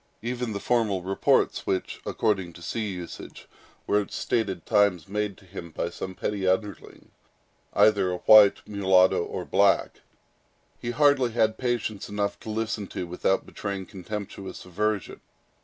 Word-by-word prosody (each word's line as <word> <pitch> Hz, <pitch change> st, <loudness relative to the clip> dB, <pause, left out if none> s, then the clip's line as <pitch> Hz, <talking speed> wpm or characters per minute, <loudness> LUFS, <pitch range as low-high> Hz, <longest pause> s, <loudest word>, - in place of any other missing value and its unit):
Even 120 Hz, 0 st, -3 dB
the 100 Hz, -, -3 dB
formal 105 Hz, -5 st, 0 dB
reports 95 Hz, +1 st, +1 dB
which, 95 Hz, -, -2 dB
according 95 Hz, -5 st, 0 dB
to 85 Hz, -, -13 dB
sea 110 Hz, +5 st, -3 dB
usage, 90 Hz, -3 st, -8 dB, 0.4 s
were, 105 Hz, -, +2 dB
at 100 Hz, -, -8 dB
stated 100 Hz, -7 st, -2 dB
times, 100 Hz, -6 st, +2 dB
made 105 Hz, 0 st, -2 dB
to 100 Hz, -, -19 dB
him 90 Hz, -2 st, -8 dB
by 85 Hz, +2 st, -3 dB
some 95 Hz, +1 st, -6 dB
petty 100 Hz, -1 st, -2 dB
underling, 100 Hz, +2 st, -2 dB, 0.6 s
either 100 Hz, -2 st, +4 dB
a 90 Hz, -, -2 dB
white, 105 Hz, +1 st, +6 dB
mulatto 95 Hz, -3 st, +3 dB
or -, -, -5 dB
black, -, -, +2 dB, 0.8 s
he 120 Hz, -, -4 dB
hardly 130 Hz, -2 st, +3 dB
had 110 Hz, -1 st, +1 dB
patience 120 Hz, -5 st, -2 dB
enough 100 Hz, 0 st, -2 dB
to -, -, -9 dB
listen 110 Hz, -2 st, -2 dB
to, 90 Hz, -, -5 dB
without 90 Hz, +2 st, 0 dB
betraying 100 Hz, -2 st, -5 dB
contemptuous 100 Hz, 0 st, -7 dB
aversion. 105 Hz, +3 st, -2 dB
100 Hz, 145 wpm, -26 LUFS, 95-110 Hz, 0.8 s, white